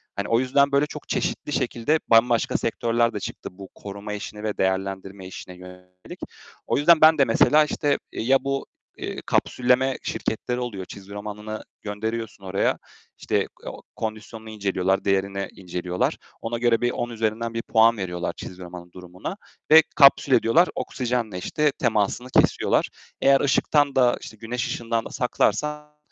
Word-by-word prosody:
Hani - - -3
o 115 +1 +3
yüzden 140 +2 +2
böyle 140 +1 +3
çok - - -10
çeşitli - - -2
şekilde 150 +7 0
bambaşka 115 0 +3
sektörler 115 0 0
de 105 - -3
çıktı - - -7
bu 95 +1 -12
koruma 100 +1 -7
işine 105 +1 -7
ve 105 -1 -3
değerlendirme 95 0 -2
işine 95 -1 -9
yönelik. 90 0 -13 0.5
O - - +1
yüzden 160 +2 +5
ben 155 0 +7
de 140 - +5
mesela, 150 +6 +5
işte, 145 -1 0
ya 130 +4 +2
bu, 135 0 -2 0.3
eee, - - -5
kapsülleme 130 +1 +1
şirketleri 125 +3 -3
oluyor, 105 -7 -5
çizgi 100 +1 -11
romanını 105 +1 -6 0.2
gönderiyorsun 110 0 -5
oraya, 95 +1 0 0.4
işte, - - -1 0.2
o - - -7
kondisyonunu 110 0 -6
inceliyorlar, 95 -2 -1
değerini 100 0 0
inceliyorlar, 90 -1 -3 0.2
ona 120 +1 -3
göre 120 -1 +2
bir 120 0 +1
10 120 - -3
üzerinden 115 0 -2
bir 115 - -2
puan 115 0 +4
veriyorlar 90 -2 -3
çizgi 95 0 -9
romanın 90 0 -10
durumuna 90 - -8 0.3
ve 160 0 +9
kapsül 140 -2 +6
ediyorlar. 125 +9 +4
Oksijenle 120 -6 -2
işte 150 +10 0
temasını 120 0 0
kesiyorlar. - - +2 0.3
Eğer 135 0 +5
ışıktan 145 0 +2
da 125 -2 +4
işte 110 - -10
güneş 115 +2 -3
ışığından 115 -1 -2
da - - -7
saklarsan 150 +5 -1
115 Hz, 150 wpm, -24 LUFS, 100-125 Hz, 0.5 s, ve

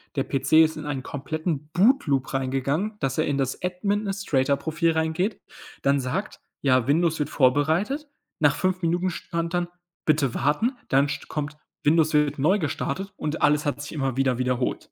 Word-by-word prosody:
Der 135 - +1
PC 135 +2 -2
ist 160 0 +6
in 155 - -6
einen 140 -3 -3
kompletten 150 +2 -4
Bootloop 175 - +2
reingegangen, 135 +10 -1
dass 135 -2 -1
er 155 - +2
in 140 -1 0
das 135 -1 -2
Administrator 180 -7 0
Profil 160 +3 0
reingeht. 160 +6 -1 0.4
Dann 140 0 +3
sagt: 135 +11 -3 0.2
„Ja, 130 -3 +3
Windows 160 +2 +2
wird 150 - -1
vorbereitet.“ 160 - +1 0.3
Nach 145 -2 +4
5 185 0 0
Minuten 175 +2 +1
stand 170 0 -4
dann: 175 0 0 0.4
„Bitte 145 -5 +2
warten“, 150 - +1 0.2
dann 135 +2 +4
st 140 - -5
kommt: 150 -1 -4 0.3
„Windows 155 +1 +3
wird 150 -1 +2
neu 185 +9 +3
gestartet“, 175 +5 -3
und 155 +1 -3
alles 150 +1 +3
hat 145 0 -1
sich 145 - -7
immer 135 -4 -2
wieder 130 -2 +2
wiederholt. 125 0 -1
150 Hz, 170 wpm, -25 LUFS, 135-175 Hz, 0.4 s, ist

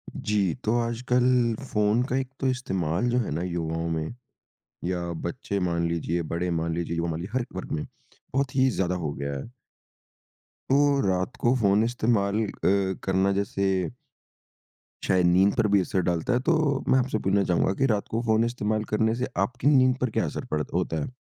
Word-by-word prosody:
जी। 100 -5 0
तो 110 +3 +2
आजकल 120 +1 0 0.5
फ़ोन 105 +2 +2
का 130 - 0
एक 135 -1 -2
तो 135 - 0
इस्तेमाल 95 -5 -1
जो 120 - +1
है 115 - -2
ना, 80 +3 -2
युवाओं 85 -2 -2
में 80 +5 -3 0.7
या 90 -1 -2
बच्चे 100 - -3
मान 85 0 0
लीजिए, 85 +1 -1
बड़े 90 +2 -1
मान 85 0 -1
लीजिए 85 0 -3
युवा 85 0 -1
मान 80 0 -3
लिए 90 +4 -6
हर 130 -2 0
वर्ग 95 - -6
में, 75 - -2 0.5
बहुत 135 -1 0
ही 130 0 +4
ज़्यादा 90 -6 -1
हो 75 - -2
गया 70 +1 -4
है। 70 - -7 1.2
तो 135 - +4 0.3
रात 95 +4 -1
को 120 - +4
फ़ोन 105 -3 +3
इस्तेमाल 110 -3 +1
अ, - - -5 0.5
करना 95 +1 +2
जैसे 95 -3 0 1.2
शायद 95 -2 +3
नींद 95 +3 +4
पर 110 - +3
भी 100 - +5
असर 95 +1 -1
डालता 85 +7 0
है 120 - +2
तो 170 - +5 0.4
मैं 130 - +5
आपसे 130 -3 0
पूछना 100 0 +2
चाहूँगा 90 +2 +1
कि - - +5
रात 100 - -2
को 115 - 0
फ़ोन 110 0 +3
इस्तेमाल 110 -2 -1
करने 110 +1 +2
से 125 +2 -2 0.2
आपकी 125 +5 -3
नींद 130 -3 +5
पर 130 - +1
क्या - - +2
असर - - -5
पड़त 75 0 -2
होता 85 -3 -1
है। - - -4
100 Hz, 190 wpm, -26 LUFS, 85-120 Hz, 1.2 s, भी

